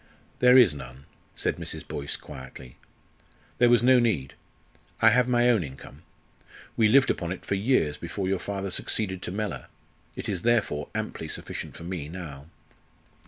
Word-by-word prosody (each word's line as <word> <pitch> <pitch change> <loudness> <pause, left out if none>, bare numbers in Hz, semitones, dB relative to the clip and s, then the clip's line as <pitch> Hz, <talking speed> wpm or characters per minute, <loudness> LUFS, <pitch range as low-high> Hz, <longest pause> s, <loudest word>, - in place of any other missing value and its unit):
"There 125 +1 +7
is 120 -11 +7
none," 65 -1 -10 0.3
said - - -1
Mrs. - - -7
Boyce, 70 -1 -3
quietly. 65 -1 -11 0.8
"There 120 - +6
was 120 -1 +5
no 130 0 +6
need. 95 - 0 0.7
I 115 - +6
have 125 +1 +3
my 120 -1 +3
own 110 -7 +2
income. 65 -2 -11 0.7
We 110 - +4
lived 130 +5 +5
upon 85 -1 -3
it 95 - -6
for - - -2
years 100 - +1
before 95 -2 -4
your 95 -1 0
father 100 -1 -4
succeeded 95 0 -1
to - - -4
Mellor. 105 +1 -4 0.5
It - - -6
is 95 -4 -2
therefore 110 -10 +1
amply - - -4
sufficient - - -6
for - - -10
me 85 -4 -5
now." 80 -5 -8
95 Hz, 165 wpm, -26 LUFS, 75-120 Hz, 0.8 s, There